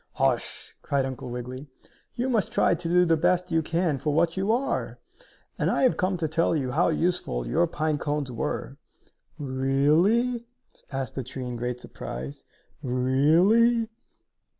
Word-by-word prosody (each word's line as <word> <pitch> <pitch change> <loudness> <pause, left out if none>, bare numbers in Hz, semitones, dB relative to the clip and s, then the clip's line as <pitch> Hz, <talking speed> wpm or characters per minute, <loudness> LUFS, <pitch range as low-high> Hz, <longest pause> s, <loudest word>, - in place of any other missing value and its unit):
"Hush!" - - -1
cried 140 -2 0
Uncle 130 -2 -6
Wiggily. 125 +3 -6 0.5
"You 245 +2 -1
must 230 -6 +1
try - - +3
to 165 0 -3
do 180 +1 +5
the 165 -1 +4
best 180 +2 +1
you 165 0 +3
can 165 -2 0
for 150 - -1
what 165 +2 +2
you 195 +3 +1
are! 255 +4 -1 0.6
And - - +2
I - - +1
have 255 - +4
come 185 0 0
to 165 -2 -1
tell 165 +2 +1
you 130 -4 -1
how 160 +7 +2
useful 160 - 0
your - - +2
pine 155 -1 -1
cones 145 -3 -2
were." 135 +2 -4 0.6
"Really?" 155 - +2 0.4
asked 135 -1 -3
the 135 - -3
tree, 130 +2 -6
in 125 -1 -4
great 120 +1 -3
surprise. 65 - -7 0.4
"Really?" 165 - +3
155 Hz, 155 wpm, -26 LUFS, 130-180 Hz, 0.6 s, do